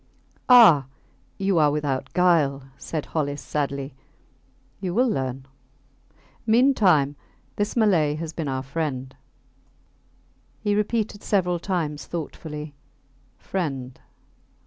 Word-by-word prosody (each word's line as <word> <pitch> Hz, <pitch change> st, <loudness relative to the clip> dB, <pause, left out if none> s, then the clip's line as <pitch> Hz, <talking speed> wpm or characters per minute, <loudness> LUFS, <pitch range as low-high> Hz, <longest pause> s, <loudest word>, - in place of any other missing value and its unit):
Ah! 190 Hz, -, +8 dB, 0.5 s
You 195 Hz, -3 st, +1 dB
are 150 Hz, -1 st, +5 dB
without 145 Hz, -3 st, -2 dB
guile, 160 Hz, -7 st, +3 dB
said 155 Hz, +1 st, -5 dB
Hollis, 145 Hz, -2 st, -2 dB
sadly. 140 Hz, -2 st, -3 dB, 0.9 s
You 185 Hz, -2 st, -3 dB
will 250 Hz, +3 st, +3 dB
learn... 130 Hz, -, -2 dB, 1.0 s
Meantime 210 Hz, -, +4 dB, 0.4 s
this 205 Hz, +1 st, -1 dB
Malay 175 Hz, -10 st, +3 dB
has 160 Hz, 0 st, -5 dB
been 160 Hz, -2 st, -4 dB
our 130 Hz, -1 st, -2 dB
friend... 135 Hz, -2 st, -4 dB, 1.4 s
He 205 Hz, -1 st, 0 dB
repeated 210 Hz, 0 st, -1 dB
several 180 Hz, -4 st, 0 dB
times 165 Hz, -6 st, -3 dB
thoughtfully, 150 Hz, -2 st, -6 dB, 0.6 s
Friend 135 Hz, -9 st, -4 dB
155 Hz, 100 wpm, -24 LUFS, 140-195 Hz, 1.4 s, Ah